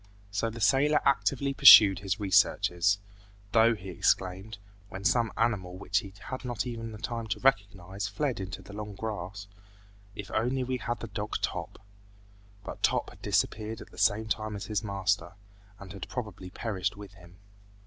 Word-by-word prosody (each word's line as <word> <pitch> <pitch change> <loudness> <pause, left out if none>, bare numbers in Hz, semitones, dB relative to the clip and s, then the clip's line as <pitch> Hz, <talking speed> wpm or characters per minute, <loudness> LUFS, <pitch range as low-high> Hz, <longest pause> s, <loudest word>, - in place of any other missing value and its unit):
So 100 +3 -1
the 115 +1 -8
sailor 135 +9 +3
actively 140 0 +1
pursued 105 -9 +9
his 100 +1 -2
researches, 95 -1 +2 0.5
though 115 +1 +5
he 95 -2 -9
exclaimed, 95 +3 -1 0.3
when 95 +1 -8
some 115 +2 +2
animal 100 -6 -1
which 100 +1 0
he 100 - -9 0.2
had 130 - -5
not 120 -2 -3
even 115 -3 -6
time 115 0 -5
to 100 - -3
recognize 100 -6 0
fled 125 +4 -2
into 95 -1 -6
the 100 - -12
long 105 -1 -7
grass, 100 -2 -5 0.7
"If 105 - -8
only 125 +4 0
we 130 0 -2
had 115 - -8
had 120 -1 -2
the 115 - -5
dog 105 +1 -5
Top!" - - -3 0.9
But - - -8
Top - - +1
had - - -17
disappeared 110 +1 -1
at - - -12
the - - -16
same 105 +1 +2
time 110 0 -2
as 100 - -6
his 105 0 -2
master, 95 -3 -1 0.4
and 100 -1 -11
had 95 -3 -8
probably 105 -7 -6
perished 100 -1 -3
with 100 -2 -11
him. 90 -2 -17
105 Hz, 170 wpm, -29 LUFS, 95-115 Hz, 0.9 s, pursued